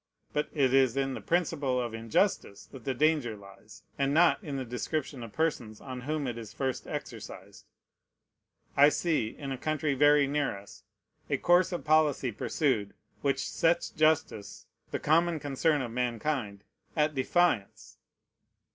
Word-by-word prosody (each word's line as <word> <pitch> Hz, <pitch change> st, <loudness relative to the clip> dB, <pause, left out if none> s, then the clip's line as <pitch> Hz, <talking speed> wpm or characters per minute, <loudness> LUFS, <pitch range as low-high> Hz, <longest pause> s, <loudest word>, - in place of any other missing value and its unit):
But 150 Hz, -, -1 dB
it 135 Hz, -4 st, +2 dB
is 135 Hz, -2 st, +4 dB
in 135 Hz, -1 st, 0 dB
the -, -, -6 dB
principle 155 Hz, -7 st, 0 dB
of 120 Hz, -2 st, -3 dB
injustice 115 Hz, -, -1 dB
that 130 Hz, -4 st, -11 dB
the 135 Hz, -, -1 dB
danger 145 Hz, -6 st, +1 dB
lies, 100 Hz, +2 st, -15 dB, 0.2 s
and 140 Hz, +1 st, +1 dB
not 175 Hz, +5 st, +4 dB
in 145 Hz, -5 st, -4 dB
the 130 Hz, -, -4 dB
description 130 Hz, +3 st, -4 dB
of 115 Hz, -2 st, -8 dB
persons 125 Hz, -9 st, -2 dB
on 130 Hz, -2 st, -7 dB
whom 150 Hz, +2 st, -2 dB
it 120 Hz, -2 st, -4 dB
is 110 Hz, -3 st, -9 dB
first 130 Hz, -2 st, -3 dB
exercised. -, -, -8 dB, 1.1 s
I 145 Hz, +1 st, +7 dB
see, 155 Hz, -7 st, 0 dB
in 135 Hz, +5 st, -7 dB
a 130 Hz, -, -4 dB
country 155 Hz, -1 st, -1 dB
very 145 Hz, +1 st, +5 dB
near 145 Hz, -5 st, -1 dB
us, 100 Hz, +1 st, -14 dB, 0.5 s
a -, -, +1 dB
course 175 Hz, +2 st, +3 dB
of 175 Hz, -, -4 dB
policy 150 Hz, -5 st, +3 dB
pursued, 115 Hz, -3 st, -1 dB, 0.3 s
which 140 Hz, -1 st, 0 dB
sets 170 Hz, +1 st, +1 dB
justice, 155 Hz, -9 st, 0 dB, 0.2 s
the -, -, -2 dB
common 165 Hz, +1 st, +2 dB
concern 145 Hz, +1 st, 0 dB
of 120 Hz, -, -5 dB
mankind, 120 Hz, -3 st, -2 dB, 0.3 s
at 155 Hz, 0 st, +2 dB
defiance. 110 Hz, -, 0 dB
135 Hz, 155 wpm, -29 LUFS, 120-155 Hz, 1.1 s, I